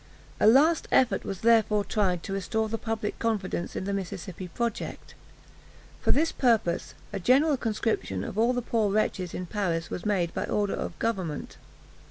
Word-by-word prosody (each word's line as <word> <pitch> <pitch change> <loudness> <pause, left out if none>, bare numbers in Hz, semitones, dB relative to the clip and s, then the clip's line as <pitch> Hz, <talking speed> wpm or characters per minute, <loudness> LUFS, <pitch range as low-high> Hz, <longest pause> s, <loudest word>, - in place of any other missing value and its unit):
A - - +5
last 300 +8 +5
effort 255 -2 +3
was 195 -2 -5
therefore 220 -3 +4
tried 185 -5 0
to 195 - -4
restore 220 +3 -1
the 225 +1 -3
public 220 -2 -3
confidence 205 -6 -2
in - - -2
the 200 +1 -2
Mississippi 185 -2 -5
project. 235 +5 -4 0.9
For - - +2
this 320 +4 +2
purpose, 225 -9 +1 0.2
a 200 - -2
general 275 - +4
conscription 215 - -1
of - - -6
all 230 +3 +3
the 245 -1 -2
poor 220 -3 +1
wretches 195 -4 0
in 185 - -4
Paris 175 -4 -2
was 180 - -4
made 185 -5 0
by - - -2
order 205 -1 0
of - - -4
government. 190 -10 -3
210 Hz, 170 wpm, -27 LUFS, 185-230 Hz, 0.9 s, A